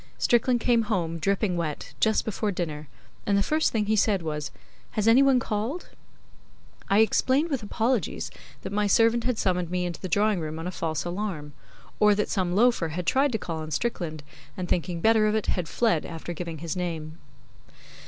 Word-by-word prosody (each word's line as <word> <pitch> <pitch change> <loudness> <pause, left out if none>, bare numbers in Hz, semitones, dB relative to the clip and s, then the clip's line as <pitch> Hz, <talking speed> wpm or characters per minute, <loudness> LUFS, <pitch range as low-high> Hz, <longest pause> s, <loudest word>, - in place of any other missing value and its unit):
Strickland 240 +1 +2
came 235 0 +3
home, 175 -7 -2
dripping 195 +2 0
wet, 160 -4 -4
just 220 -1 +2
before 215 -1 -1
dinner, 155 -5 -4 0.4
and 200 -1 +3
the 200 - +2
first 310 +6 +1
thing 215 -2 0
he 215 +1 +2
said 200 -3 +2
was. 150 -3 -3 0.4
'Has 215 0 0
any 235 +4 +7
one 275 -2 +5
called?' 230 +10 -3 1.0
I 200 +2 +5
explained, 265 +8 +2
with 270 -4 -1
apologies, 225 +3 -1 0.3
that - - -5
my 210 0 +1
servant 230 +3 +3
had 250 -3 0
summoned 180 -4 0
me 180 0 -1
into 175 -1 -5
the 185 - -4
drawing 205 +2 +2
room 155 -1 -4
on 165 - -6
a 180 - -3
false 160 -2 -3
alarm; 175 -5 -4 0.5
or 210 -1 +5
that 210 - -1
some 185 -3 0
loafer 230 -5 +3
had 170 +3 -4
tried 270 +8 +3
to - - +2
call 165 -5 -5
on 155 0 -6
Strickland, 160 -4 -3 0.3
and 180 -1 -3
thinking 175 -1 -1
better 220 0 +4
of 210 - +1
it 220 - 0
had 175 -4 -1
fled 220 -10 +1
after 165 +1 -6
giving 170 -1 -5
his 165 +3 -4
name. 165 -3 -4
195 Hz, 195 wpm, -26 LUFS, 165-220 Hz, 1.0 s, any